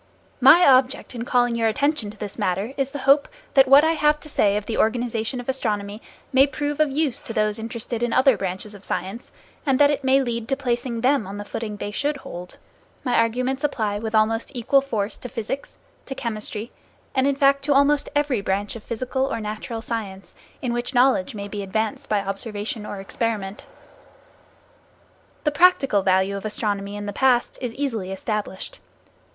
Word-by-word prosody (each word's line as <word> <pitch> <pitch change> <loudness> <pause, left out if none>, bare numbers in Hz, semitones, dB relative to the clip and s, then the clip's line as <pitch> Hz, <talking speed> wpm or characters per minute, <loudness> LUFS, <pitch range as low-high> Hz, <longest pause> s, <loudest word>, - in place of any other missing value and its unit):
My 290 +8 +8
object 260 0 +3
in 235 -1 -5
calling 245 -1 +2
your 230 -1 +1
attention 280 0 0
to 210 - -11
this 205 +1 -7
matter 200 +4 -1
is 275 -1 -1
the 285 - -6
hope 280 +1 +5 0.3
that 270 -1 +6
what 275 +3 +8
I 320 - +4
have 300 -2 +2
to 305 - -10
say 205 -7 +2
of 210 - -4
the 225 - -3
organization 235 +1 0
of 245 - -8
astronomy 210 -5 -2 0.3
may 265 +2 +6
prove 290 +1 -3
of 305 -1 +4
use 280 -2 0
to 225 - -6
those 215 0 +1
interested 230 +1 -4
in 240 -1 0
other 260 +1 +5
branches 190 +2 -4
of 200 -1 -13
science, 195 +7 -4 0.3
and 270 -3 +2
that 290 +1 +5
it 290 -1 -2
may 265 +1 +4
lead 235 -2 -3
to 270 - +1
placing 240 -3 -2
them 255 -4 +2
on 200 +1 -6
the 205 - -6
footing 210 -1 -5
they 205 - -4
should 285 +7 -1
hold. 180 -8 -9 0.5
My 250 - -1
arguments 250 +4 +1
apply 215 -8 -1
with 220 0 -3
almost 225 +1 +2
equal 260 +3 +3
force 220 -7 -3
to 250 - -8
physics, 230 +5 -5 0.3
to 270 - -5
chemistry, 215 -1 -4 0.4
and 265 0 +2
in 280 - +2
fact 275 0 +4
to 290 - +3
almost 285 +1 +3
every 290 -7 +1
branch 200 +2 -2
of 225 - -9
physical 255 +3 -2
or 230 - -2
natural 215 +1 -5
science, 200 -5 -5 0.3
in 245 -2 -1
which 240 +2 -2
knowledge 245 -6 +3
may 200 -1 -5
be 205 0 -5
advanced 220 +8 -2
by 210 -2 +2
observation 210 +2 -4
or 200 - -6
experiment. 205 0 -3 1.8
The 300 - +2
practical 295 - +4
value 190 +1 +2
of 195 - -5
astronomy 205 -2 -2
in 205 0 -5
the 205 - -4
past 250 +1 +2
is 245 -2 -4
easily 230 -9 -2
established. 200 0 -4
230 Hz, 190 wpm, -23 LUFS, 210-270 Hz, 1.8 s, My